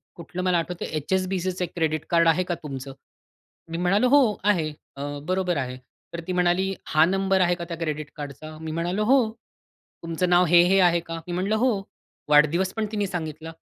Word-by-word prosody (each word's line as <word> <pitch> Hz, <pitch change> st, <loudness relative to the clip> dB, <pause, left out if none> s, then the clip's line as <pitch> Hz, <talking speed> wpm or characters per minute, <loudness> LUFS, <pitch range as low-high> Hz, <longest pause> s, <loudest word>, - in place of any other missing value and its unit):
कुठलं 175 Hz, +2 st, -6 dB
मला 180 Hz, -1 st, +2 dB
आठवतंय, 170 Hz, +1 st, -3 dB, 0.2 s
"HSBCचं 185 Hz, -1 st, 0 dB
एक 180 Hz, -, -5 dB
क्रेडिट 155 Hz, -2 st, -1 dB
कार्ड 170 Hz, -1 st, +4 dB
आहे 165 Hz, +3 st, +3 dB
का -, -, +1 dB
तुमचं?" 135 Hz, -2 st, -6 dB, 0.8 s
मी 165 Hz, -, -3 dB
म्हणालो 195 Hz, +7 st, +2 dB
"हो, 285 Hz, +2 st, +7 dB, 0.2 s
आहे. 180 Hz, -7 st, +2 dB, 0.3 s
अ, 140 Hz, -, -5 dB, 0.2 s
बरोबर 185 Hz, -2 st, 0 dB
आहे." 130 Hz, -2 st, -3 dB, 0.4 s
तर 170 Hz, -, -4 dB
ती 185 Hz, -, -1 dB
म्हणाली, 180 Hz, +2 st, +1 dB
"हा 155 Hz, +1 st, +4 dB
नंबर 195 Hz, +1 st, +1 dB
आहे 175 Hz, -1 st, +3 dB
का 175 Hz, -, -6 dB
त्या 170 Hz, -, -4 dB
क्रेडिट 155 Hz, -3 st, -4 dB
कार्डचा?" 150 Hz, +2 st, -8 dB
मी 160 Hz, 0 st, -5 dB
म्हणालो 175 Hz, +6 st, -1 dB
हो. 265 Hz, +4 st, +5 dB, 0.8 s
"तुमचं 165 Hz, +2 st, -1 dB
नाव 180 Hz, 0 st, +5 dB
हे-हे 175 Hz, +2 st, +6 dB
आहे 170 Hz, 0 st, +1 dB
का?" 165 Hz, -, -3 dB
मी 175 Hz, -, -4 dB
म्हटलं 190 Hz, +4 st, 0 dB
हो. 250 Hz, +4 st, +3 dB, 0.6 s
वाढदिवस 155 Hz, +6 st, +4 dB
पण 220 Hz, -1 st, -1 dB
तिने 205 Hz, -2 st, -1 dB
सांगितला. 160 Hz, -3 st, -5 dB
175 Hz, 185 wpm, -25 LUFS, 160-185 Hz, 0.8 s, हो